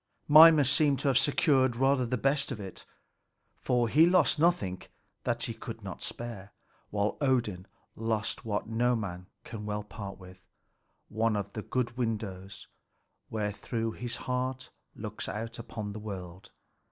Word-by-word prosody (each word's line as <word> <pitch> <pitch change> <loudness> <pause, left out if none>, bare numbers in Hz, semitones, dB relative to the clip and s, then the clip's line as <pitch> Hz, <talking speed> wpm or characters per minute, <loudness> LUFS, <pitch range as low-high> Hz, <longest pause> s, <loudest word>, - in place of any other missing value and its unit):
Mimer 155 0 +9
seemed 140 +1 +3
to 140 - +2
have 130 - +3
secured 135 -4 +3
rather 135 0 +2
the 125 +2 -1
best 140 +3 +1
of 120 - -4
it; 95 -2 -8 0.7
for 120 -2 +1
he 155 +8 +6
lost 175 -4 +4
nothing 105 - +2 0.4
that - - 0
he - - -2
could - - -8
not - - -7
spare, 105 -5 -6 0.4
while 100 0 -1
Odin 120 -9 0 0.3
lost 110 0 -2
what 105 -3 -2
no 120 +2 +2
man 90 -5 -5 0.2
can 110 -2 -7
well 105 0 -3
part 100 -2 -8
with, 95 0 -15 0.6
one 110 0 0
of 100 -1 -3
the 110 - -4
good 120 +1 -2
windows 100 -5 -4 0.6
wherethrough 110 +2 -2
his 120 +1 -5
heart 130 0 -3 0.2
looks - - -6
out 115 +2 -5
upon 110 -3 -6
the 110 - -6
world. 95 -3 -8
115 Hz, 150 wpm, -30 LUFS, 105-130 Hz, 0.7 s, Mimer